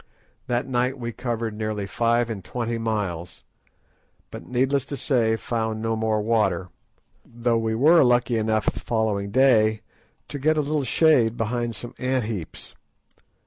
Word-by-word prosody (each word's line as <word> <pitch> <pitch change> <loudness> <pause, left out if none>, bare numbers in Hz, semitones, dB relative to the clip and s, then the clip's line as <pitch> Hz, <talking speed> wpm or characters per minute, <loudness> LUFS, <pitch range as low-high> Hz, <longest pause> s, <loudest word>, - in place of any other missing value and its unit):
That 120 -1 0
night 125 +1 0
we 120 -2 -4
covered 115 -2 -3
nearly 105 -1 -3
five 115 +3 +1
and 100 -4 -6
twenty 115 0 -3
miles; 100 -7 -3 0.9
but, - - -9
needless 130 +2 +1
to 140 - -5
say, 115 -6 +1
found 110 -1 -3
no 115 0 -1
more 110 -1 0
water, 110 -4 +1 0.5
though 120 0 -1
we 110 0 -1
were 155 +7 +6
lucky 120 -2 +2
enough 110 -1 0
the - - -1
following 110 -3 -1
day 110 -3 +3 0.5
to 145 - -5
get 155 +3 +2
a - - +3
little 150 0 -1
shade 125 -5 +3
behind 120 0 -2
some 120 +3 -6
ant 130 -1 0
heaps. 105 -7 -6
115 Hz, 150 wpm, -24 LUFS, 110-125 Hz, 0.9 s, were